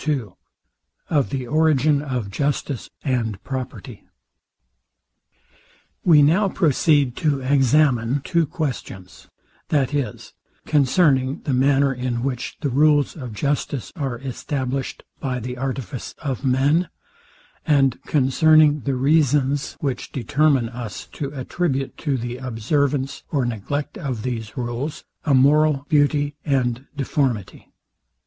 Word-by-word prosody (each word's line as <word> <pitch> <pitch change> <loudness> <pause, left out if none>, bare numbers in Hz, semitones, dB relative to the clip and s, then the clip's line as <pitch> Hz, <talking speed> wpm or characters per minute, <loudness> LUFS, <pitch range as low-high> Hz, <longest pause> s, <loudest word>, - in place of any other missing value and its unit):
II 135 -8 0 0.8
OF 145 -5 +2
THE 135 -2 -3
ORIGIN 150 0 +3
OF 125 -8 -3
JUSTICE 140 +1 -2
AND 115 -7 -1
PROPERTY 130 -2 -6 2.0
We 155 -4 +6
now 185 +8 +3
proceed 145 -6 +2
to 145 -3 0
examine 135 -1 +2
two 170 -3 +1
questions, 115 - -5 0.4
viz, 140 -2 -1 0.3
CONCERNING 140 -1 +2
THE 140 - -1
MANNER, 135 +1 +3
IN 125 -1 -3
WHICH 130 -2 -3
THE 145 - 0
RULES 145 +2 +3
OF 130 -7 -7
JUSTICE 140 +2 -2
ARE 135 -7 -3
ESTABLISHED 135 +1 -4 0.2
BY 130 -2 -2
THE 125 +2 -6
ARTIFICE 130 -3 -5
OF 135 -3 -4
MEN; 140 +6 +2 0.7
and 135 -4 +2
CONCERNING 150 +2 +4
THE 135 - 0
REASONS, 140 0 +2
WHICH 135 -4 -3
DETERMINE 135 -1 +1
US 115 -5 -7
TO 140 -2 -5
ATTRIBUTE 135 0 -2
TO 145 -4 -1
THE 120 +1 -4
OBSERVANCE 135 +3 -1
OR 140 -5 +1
NEGLECT 140 - -3
OF 130 - -4
THESE 115 -4 -4
RULES 125 +5 -4 0.2
A 145 -3 +3
MORAL 145 +1 +4
BEAUTY 145 -1 +2
AND 130 -2 0
DEFORMITY. 130 -7 -2
135 Hz, 115 wpm, -22 LUFS, 125-145 Hz, 2.0 s, We